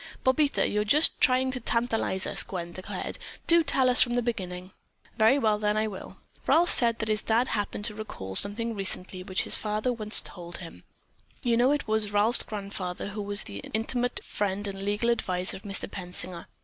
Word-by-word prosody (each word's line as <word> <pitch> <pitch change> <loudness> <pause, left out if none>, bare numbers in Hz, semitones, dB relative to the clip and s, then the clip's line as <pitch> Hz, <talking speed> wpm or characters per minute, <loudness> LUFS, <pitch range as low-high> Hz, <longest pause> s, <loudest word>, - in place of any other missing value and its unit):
"Bobita, 280 +2 +3
you're 210 0 0
just 295 +9 +2
trying 260 0 +3
to 255 - -4
tantalize 230 -5 0
us," - - +1
Gwen 175 -2 -3
declared. 185 +2 -5 0.3
"Do 335 0 +5
tell 265 -3 +3
us 250 0 +5
from 240 -1 +3
the 245 - +1
beginning." 185 -5 -4 0.5
"Very 220 +5 +5
well 215 -5 +2
then, 210 0 +1
I 215 - +2
will. 205 -3 -7 0.3
Ralph 345 +2 +4
said 230 -2 +4
that 220 - -3
his 215 -1 +1
dad 235 +3 +1
happened 205 -1 -2
to 210 - -4
recall 210 - -7
recently 205 - 0
something 185 -1 -3
which 185 - 0
his - - +3
father 215 +3 -1
had 235 - -6
once 215 0 +3
told 175 -1 -7
him. 170 -2 -11 0.6
You 240 -2 +2
know 245 +3 +4
it 290 -3 0
was 215 -1 +3
Ralph's 210 +4 +4
grandfather 200 -3 -4
who 210 +1 -5
was 205 0 +2
the 100 0 -8 0.2
intimate 245 +3 -1
friend 205 0 -2
and 195 -1 -6
legal 205 +4 0
advisor 185 -5 -2
of - - -13
Mr. 200 -1 -2
Pensinger. 180 -1 -5
215 Hz, 195 wpm, -27 LUFS, 195-240 Hz, 0.6 s, Do